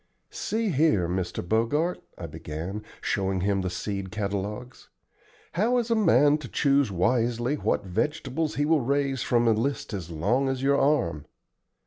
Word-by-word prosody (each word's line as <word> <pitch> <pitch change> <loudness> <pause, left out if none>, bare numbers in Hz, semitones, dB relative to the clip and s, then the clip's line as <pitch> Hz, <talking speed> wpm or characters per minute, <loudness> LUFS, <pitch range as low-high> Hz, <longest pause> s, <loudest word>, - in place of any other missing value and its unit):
"See 220 0 -1
here, 150 - +3
Mr. 90 -1 -3
Bogart," 130 - +1 0.2
I - - -6
began, 85 +7 -6 0.2
showing 95 -2 0
him 100 0 +1
the 95 - -2
seed 100 +2 -4
catalogues, 105 +4 -4 0.6
"how 225 +8 +2
is 235 -1 -1
a - - +4
man 145 - +4
to 145 - -8
choose 140 -2 +2
wisely 120 +6 +1
what 105 -8 -1
vegetables 150 - -2
he 145 - +1
will 155 -1 +3
raise 135 0 0
from 120 -1 +2
a - - +6
list 115 +2 -1
as 90 -5 -5
long 120 - +1
as 135 0 -2
your 140 +1 +3
arm? 120 - +1
120 Hz, 155 wpm, -26 LUFS, 100-145 Hz, 0.6 s, a